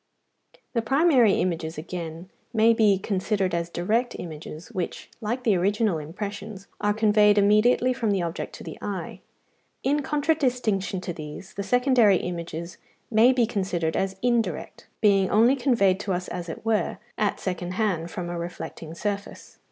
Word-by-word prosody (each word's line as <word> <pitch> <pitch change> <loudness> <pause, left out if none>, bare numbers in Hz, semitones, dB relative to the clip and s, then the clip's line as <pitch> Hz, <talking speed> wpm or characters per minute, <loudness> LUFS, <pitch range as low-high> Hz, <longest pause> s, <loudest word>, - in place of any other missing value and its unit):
The 230 - +1
primary 265 - +4
images, 165 -3 -1
again, 165 +2 -6 0.2
may 225 +1 +5
be 215 -3 +4
considered 195 -1 -1
as 170 0 -1
direct 220 +9 0
images, 160 +1 -8
which, 185 -6 -5
like 240 +4 -2
the 215 -5 +3
original 200 0 +1
impressions, 200 +5 -6
are 205 - +2
conveyed 210 -1 +4
immediately 215 +5 +4
from 240 -4 -1
the 195 -3 +1
object 170 -1 -4
to - - -10
the - - -8
eye. - - -5 0.6
In 290 +2 +2
contradistinction 250 - 0
to 175 - -4
these, 155 +4 -9
the 200 - -4
secondary 245 -3 +4
images 170 -1 -5 0.3
may 225 +3 +6
be 250 -2 +3
considered 185 -7 -1
as 190 0 -1
indirect, 230 -9 -1
being 195 -3 +4
only 230 +5 +5
conveyed 230 -8 +2
to 195 - -2
us, 180 0 -3
as 175 -1 -5
it 165 - -7
were, 225 -2 +1 0.2
at 210 -1 0
second 180 -1 -3
hand 185 -6 0
from 175 +1 -5
a 175 0 -4
reflecting 170 -1 -7
surface. 200 +2 -5
200 Hz, 155 wpm, -25 LUFS, 175-225 Hz, 0.6 s, may